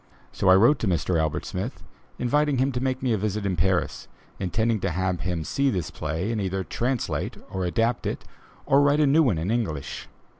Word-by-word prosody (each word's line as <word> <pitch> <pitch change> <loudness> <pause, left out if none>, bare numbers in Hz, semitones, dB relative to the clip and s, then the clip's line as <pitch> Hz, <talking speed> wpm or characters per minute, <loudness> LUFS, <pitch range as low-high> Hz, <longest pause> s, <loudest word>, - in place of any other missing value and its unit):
So - - +1
I 95 - +8
wrote 120 +8 +5
to 110 - -1
Mr. 85 -1 +1
Albert 80 -1 -1
Smith, 100 +8 -5 0.3
inviting 145 +3 +1
him 135 +2 +2
to 125 -1 -3
make 130 0 -1
me 125 -3 +2
a 110 - 0
visit 105 0 -2
in 95 -2 0
Paris, 90 +1 0 0.3
intending 110 +4 0
to 95 - -1
have 90 +1 -1
him 85 -2 -2
see 140 - +1
this 90 - -2
play 80 +8 -3
and 110 -2 -1
either 95 0 -2
translate 120 +5 -2
or 95 -1 -2
adapt 115 +7 0
it, - - -4 0.4
or 140 0 +4
write 145 +1 +3
a 150 - +5
new 145 +4 +5
one 120 - +2
in 85 +6 -1
English. 95 - -3
105 Hz, 210 wpm, -25 LUFS, 90-125 Hz, 0.4 s, I